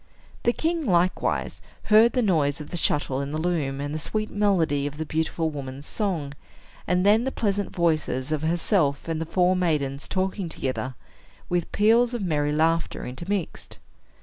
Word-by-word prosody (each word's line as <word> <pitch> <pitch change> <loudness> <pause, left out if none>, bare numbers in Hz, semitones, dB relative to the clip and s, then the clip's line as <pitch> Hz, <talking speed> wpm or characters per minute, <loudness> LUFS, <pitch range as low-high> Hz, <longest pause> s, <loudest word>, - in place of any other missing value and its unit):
The 240 - +3
king 325 +5 -1
likewise 180 -1 +1 0.2
heard 220 +2 +5
the 250 - +2
noise 155 -8 +1
of 150 - -9
the 175 - -2
shuttle 140 -4 +1
in 140 0 -4
the 155 - -2
loom 155 -5 -1
and 145 +1 -3
the 155 - -2
sweet 215 +6 -3
melody 170 -9 +1
of 145 +1 -7
the 160 - -3
beautiful 160 +1 -1
woman's 140 -1 -7
song, 170 -10 -2 0.5
and 180 +1 +2
then 215 +3 +5
the 265 - -1
pleasant 205 -4 -1
voices 155 -5 0
of 155 -2 0
herself 160 -3 +1
and 160 -1 -2
the 165 - -3
four 180 +2 +2
maidens 150 -6 -1
talking 190 -1 -2
together, 130 -3 -3 0.5
with 175 -1 -1
peals 230 +3 +3
of 230 - -3
merry 150 -4 0
laughter 165 +2 0
intermixed. 170 +8 -4
165 Hz, 170 wpm, -25 LUFS, 145-195 Hz, 0.5 s, heard